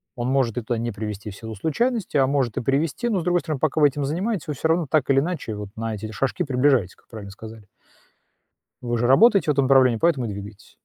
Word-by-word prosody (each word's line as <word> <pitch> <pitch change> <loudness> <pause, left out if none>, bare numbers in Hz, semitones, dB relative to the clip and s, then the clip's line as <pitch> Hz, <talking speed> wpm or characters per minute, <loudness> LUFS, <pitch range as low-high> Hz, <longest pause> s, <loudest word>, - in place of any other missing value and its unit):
Он 120 +1 -2
может 130 -4 +1
и - - 0
туда 115 +1 -3
не 120 +1 -3
привести 105 0 -6
в - - -11
силу 110 +1 -8
случайностей, 200 - -1
а 135 -1 +4
может 135 -5 0
и - - 0
привести. 150 - -1
Но, 200 -5 +1
с - - -4
другой 175 0 +1
стороны, 155 -5 -4
пока 155 0 0
вы 145 - +7
этим 140 +1 -4
занимаетесь, 180 +5 -2
вы 150 - -2
всё 160 +4 -2
равно 165 0 +2
так 150 -3 +1
или 135 0 +4
иначе 155 -9 -3
вот 105 -1 -7
на 115 0 -4
эти 105 - -7
эти 110 - -7
шажки 135 - -1
приближаетесь, 130 - +1
как - - -30
правильно 105 -3 -9
сказали. 110 0 -12 1.2
Вы 120 -1 -2
же 120 - +1
работаете 195 - +5
в - - +5
этом 135 -1 +2
направлении, 130 -4 +4
поэтому 145 -7 +1
и - - -4
двигаетесь. 100 0 -9
130 Hz, 250 wpm, -23 LUFS, 110-155 Hz, 1.2 s, вы